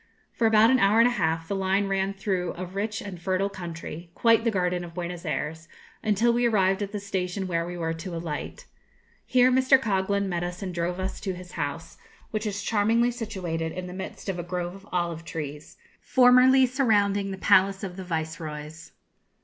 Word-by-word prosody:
For 230 - +2
about 220 +2 +6
an 260 - +4
hour 200 +1 +4
and 230 +1 +7
a - - +1
half 165 -7 -1
the 200 - -2
line 195 +1 +1
ran 195 0 -1
through 190 -3 -2
a 185 - -4
rich 200 +4 -3
and 185 -4 -8
fertile 190 +2 0
country, 170 -2 -7
quite 230 -1 +4
the 230 - +2
garden 180 -3 0
of 170 -1 -10
Buenos 175 0 -5
Ayres, 160 +1 -3 0.3
until 220 +3 +2
we 240 0 +2
arrived 195 -3 +2
at 200 -1 -3
the 210 - -3
station 190 -1 -3
where 170 -2 -1
we 175 0 -6
were 165 -1 -1
to 170 +2 -6
alight. 165 - -5 0.6
Here 255 0 +5
Mr. 260 +1 +5
Coghlan 200 -3 0
met 175 -2 -2
us 175 +2 -5
and 185 -2 -4
drove 175 +1 -2
us 190 +1 -3
to 190 -3 -3
his 180 0 -10
house, 145 +3 -5 0.3
which 215 0 -2
is 200 -1 -3
charmingly 225 +4 +2
situated 185 -9 -4
in 185 0 -5
the 180 - -7
midst 190 +2 -7
of 190 -2 -2
a - - -3
grove 175 0 -3
of 195 +1 -14
olive 170 -2 -2
trees, 150 -2 -7 0.2
formerly 255 +1 +6
surrounding 205 -6 +2
the 190 - -5
palace 195 +1 +3
of 185 -2 -5
the 190 - -6
viceroys. 160 -2 -5
190 Hz, 200 wpm, -26 LUFS, 175-210 Hz, 0.6 s, and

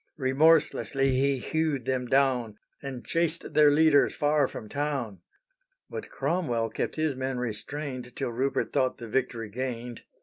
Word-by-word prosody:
Remorselessly 135 -1 +3
he 135 +1 +2
hewed 150 -1 -1
them 130 -1 -1
down, 125 -5 +2 0.2
And 135 -3 -7
chased 165 -1 -1
their 150 0 +6
leaders 150 0 +4
far 145 -1 +2
from 110 - -8
town. 135 - -3 0.7
But - - -6
Cromwell 120 -11 -1
kept - - -3
his 155 -3 0
men 130 0 -3
restrained 125 +2 -5
Till - - -2
Rupert 130 +4 -1
thought 130 -1 +1
the 120 -3 -8
victory 115 -2 -2
gained. 120 0 -5
135 Hz, 140 wpm, -28 LUFS, 125-145 Hz, 0.7 s, their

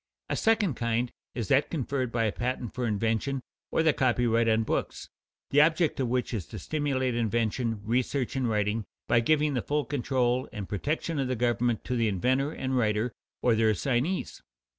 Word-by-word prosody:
A - - 0
second 220 -7 +2
kind 115 +1 -1 0.2
is 115 -5 -2
that 135 +2 +3
conferred 135 -5 -2
by 115 -1 +1
a 110 - +1
patent 120 0 -3
for 125 -2 -2
invention, 115 +5 0 0.3
or 160 - +1
the 160 -2 +4
copyright 120 -3 +2
on 110 0 +3
books, - - -3 0.4
the 145 - +6
object 165 0 +2
of 130 - +1
which 125 +1 -1
is 100 -7 -3
to - - -8
stimulate 135 -4 -1
invention, 115 -1 0
research, 125 +3 0
and 130 -3 0
writing 105 0 0 0.2
by 120 - +4
giving 150 +4 +2
the 125 - 0
full 145 +3 -1
control 130 -2 0
and 100 -2 -6
protection 150 - -2
of 135 - 0
the 130 - -1
government 120 -1 +1
to 125 - -2
the 115 -2 +2
inventor 130 - +1
and 130 -4 -1
writer 110 +1 +1 0.3
or 120 - +4
their 110 0 +3
assignees. 130 - -1
125 Hz, 185 wpm, -28 LUFS, 115-135 Hz, 0.4 s, the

